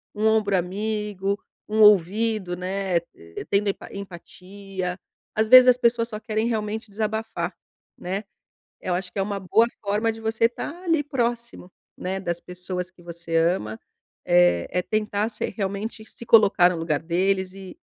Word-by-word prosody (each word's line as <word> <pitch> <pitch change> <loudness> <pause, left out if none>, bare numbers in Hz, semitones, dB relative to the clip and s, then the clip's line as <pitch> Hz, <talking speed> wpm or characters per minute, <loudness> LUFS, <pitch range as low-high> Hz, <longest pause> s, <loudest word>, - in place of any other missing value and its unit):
um 210 +1 -1
ombro 215 -2 +2
amigo, 200 +1 -2 0.3
um 215 +1 +2
ouvido, 210 -1 +4
né, 190 0 -2 0.2
eh, 85 0 -9
tendo 205 +1 +2
empa 195 - -5
empatia. 190 0 -7 0.4
Às 220 +1 +2
vezes 255 +1 +10
as 250 -1 +6
pessoas 235 -1 +2
só 215 -2 -5
querem 220 +1 -1
realmente 220 -1 -3
desabafar, 220 +1 -3 0.4
né? 190 +3 -4 0.6
Eu 180 - -2
acho 180 0 -4
que - - -6
é - - +2
uma 200 0 -2
boa 215 +5 +3 0.2
forma 210 +2 +1
de 225 - -11
você 225 0 0
estar 240 +4 -5
ali 330 -4 +2
próximo, 235 -7 -3 0.3
né, 190 +1 -3
das 170 -2 -3
pessoas 180 0 -6
que 180 -1 -20
você 170 -1 -5
ama. 165 - +1 0.5
Eh, 90 -1 +4
é 180 - 0
tentar 215 +1 -1
se 215 - -5
realmente 200 +2 -4
se 235 - -12
colocar 205 -6 +6
no 180 - -3
lugar 165 -3 -1
deles 185 +3 0
e 190 -1 -11
200 Hz, 160 wpm, -24 LUFS, 180-220 Hz, 0.6 s, vezes